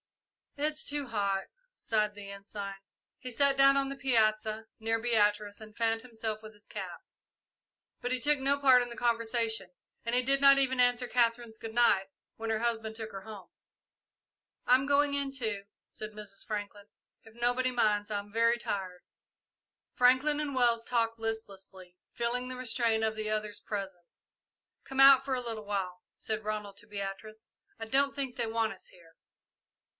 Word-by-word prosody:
"It's 300 +1 0
too 290 -1 -1
hot," 200 -4 -1 0.3
sighed 210 - 0
the 205 -1 -9
Ensign. 200 0 -6 0.5
He 255 - -6
sat 280 +3 +4
down 275 0 +6
on 275 0 +1
the 275 - -5
piazza, 220 -4 +1
near 225 +1 0
Beatrice, 210 -3 +1
and 215 -1 -12
fanned 225 -1 +1
himself 220 -3 -5
with 215 0 -11
his 210 0 -21
cap; - - -7 1.0
but 245 - -2
he 255 - +1
took 290 +4 +3
no 275 +1 +2
part 260 -3 +6
in 245 - -3
the 235 - -9
conversation, 230 -4 0 0.3
and 245 +2 +1
did 275 +1 +3
not 275 0 +8
even 260 -2 +2
answer 245 0 +3
Katherine's 235 -2 +1
"good 225 0 -7
night" 205 -5 +4 0.3
when 225 0 -5
her 220 -1 0
husband 225 -2 -2
took 220 -1 -6
her 195 - -7
home. 205 -2 -11 1.2
"I'm 260 +2 +4
going 285 0 +3
in, 280 -1 0
too," 220 -7 -3 0.2
said 215 0 -7
Mrs. 210 -2 -9
Franklin, 205 -1 -5 0.4
"if 225 0 -17
nobody 245 +2 +1
minds. 210 -4 +1
I'm 205 0 -4
very 230 +1 +3
tired." 185 -5 -4 0.9
Franklin 260 +4 +3
and 295 -2 -2
Wells 235 -2 +3
talked 230 -1 0
listlessly, 195 -5 -6 0.2
feeling 245 +2 -1
the 255 - -5
restraint 230 -2 0
of 220 0 0
the 215 0 -3
others' 215 -1 -3
presence. 190 -4 -7 0.6
"Come 270 0 -6
out 270 -1 +9
for 270 -1 -1
a 250 - -1
little 225 -3 -5
while," 190 -3 -3 0.2
said 220 0 -3
Ronald 210 -2 -4
to 205 - -10
Beatrice. 210 +1 -7 0.3
"I 225 - -4
don't 275 +4 +2
think 270 -3 -3
they 235 -2 -1
want 225 -1 0
us 190 - -15
here." 165 -2 -18
225 Hz, 170 wpm, -30 LUFS, 210-250 Hz, 1.2 s, out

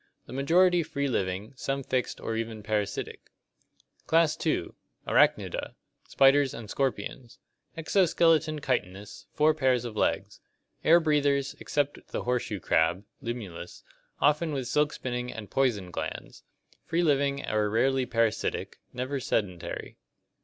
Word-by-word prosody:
The - - -10
majority 175 +6 +4
free 140 -3 -2
living, 95 -2 -2
some 135 +1 -3
fixed 130 -1 -2
or 115 - -3
even 110 -1 -4
parasitic. 105 -2 -3 0.8
Class 165 -1 +4
II. - - 0 0.4
Arachnida - - +5
(Gr. - - -8
apdxyrj, - - -4
spider). - - -8 0.3
Spiders 135 0 +4
and 110 -3 -8
scorpions. 125 -2 -3 0.4
Exo 175 +2 +2
skeleton 160 -2 +3
chitinous, 100 -7 -3
four 155 +1 +4
pairs 130 -4 +1
of 115 -3 -6
legs. - - -1 0.4
Air 170 +2 +7
breathers, 145 -3 +1
except 145 -1 -2
the - - -4
horseshoe 125 -4 -1
crab 85 +3 +1 0.2
(Limulus), 100 -8 -6 0.4
often 150 +2 +2
with 130 -3 -3
silk 150 +3 +2
spinning 125 -1 -4
and 105 -4 -9
poison 110 -9 0
glands. - - -6 0.4
Free 170 +2 0
living 140 -2 +1
or 105 -1 +1
rarely 130 +4 +2
parasitic, 115 -2 -1
never 130 +3 -3
sedentary. 95 -8 -3
130 Hz, 135 wpm, -28 LUFS, 110-145 Hz, 0.8 s, Air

